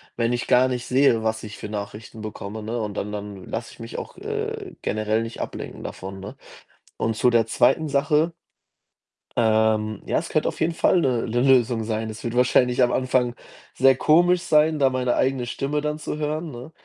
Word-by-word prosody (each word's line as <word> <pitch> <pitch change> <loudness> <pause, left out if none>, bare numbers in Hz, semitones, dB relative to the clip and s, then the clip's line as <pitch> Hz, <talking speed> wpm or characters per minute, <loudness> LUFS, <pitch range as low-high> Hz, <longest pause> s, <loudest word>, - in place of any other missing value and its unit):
wenn 115 0 0
ich 120 -1 -2
gar 130 +1 +4
nicht 125 -1 -3
sehe, 125 -3 +3
was 110 0 -1
ich 105 -1 -8
für - - -6
Nachrichten 105 +1 -7
bekomme, 105 0 -6
ne, 115 +2 -3
und 105 -1 -3
dann 105 - -3
dann 100 -2 -6
lasse 115 +1 -5
ich - - -19
mich 115 0 -7
auch, - - -9
äh, - - -5
generell 110 +1 0
nicht 115 0 -6
ablenken - - -6
davon, 95 +1 -7
ne? 100 - -9 0.6
Und 110 -1 -1
zu 125 - +3
der 115 -2 +3
2. 150 +7 +2
Sache 150 +4 +2 1.0
ähm, 110 -2 +2
ja, - - 0
es - - -3
könnte - - +1
auf - - -9
jeden 165 +1 +1
Fall 175 +2 +3
'ne 125 -5 0
'ne 120 +2 0
Lösung 125 -3 +3
sein. 110 0 -2
Es 110 0 -8
wird 120 0 -3
wahrscheinlich 125 0 +3
am 120 - +4
Anfang 125 -2 +1 0.4
sehr 135 0 +5
komisch 175 +5 +4
sein, 155 -1 +3
da 135 -1 +4
meine 125 -1 0
eigene 130 -2 +1
Stimme 140 +4 -2
dann 150 0 -2
zu 150 - -4
hören, 155 +2 -3
ne? 125 +4 -9
120 Hz, 200 wpm, -23 LUFS, 110-135 Hz, 1.0 s, sehr